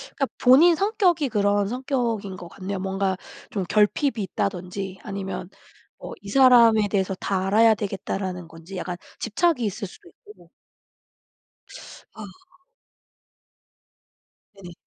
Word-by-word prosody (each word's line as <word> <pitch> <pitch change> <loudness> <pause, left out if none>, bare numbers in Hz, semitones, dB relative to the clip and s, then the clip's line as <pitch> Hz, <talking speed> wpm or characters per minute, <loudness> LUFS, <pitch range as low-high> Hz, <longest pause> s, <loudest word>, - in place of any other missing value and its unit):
그러니까 275 - 0 0.2
본인 300 +8 +7
성격이 360 - +1
그런 205 -1 +1
성격인 235 -5 -2
것 175 - -9
같네요. 195 +2 -5
뭔가 190 0 -1 0.3
좀 195 -3 -2
결핍이 215 - +2
있다든지 190 0 -4
아니면 195 -3 -5 0.5
뭐 - - -8
이 200 - -10
사람에 235 -4 +6
대해서 190 -2 0
다 190 0 -2
알아야 220 +2 +5
되겠다라는 190 -3 -4
건지 165 +3 -10
약간 180 0 -4 0.2
집착이 270 +4 +1
있을 205 0 -4
수도 - - -16
있고. 425 -3 -19 1.6
아. 215 - -8 2.4
네네. 175 -1 -10
200 Hz, 260 characters per minute, -24 LUFS, 190-245 Hz, 2.4 s, 본인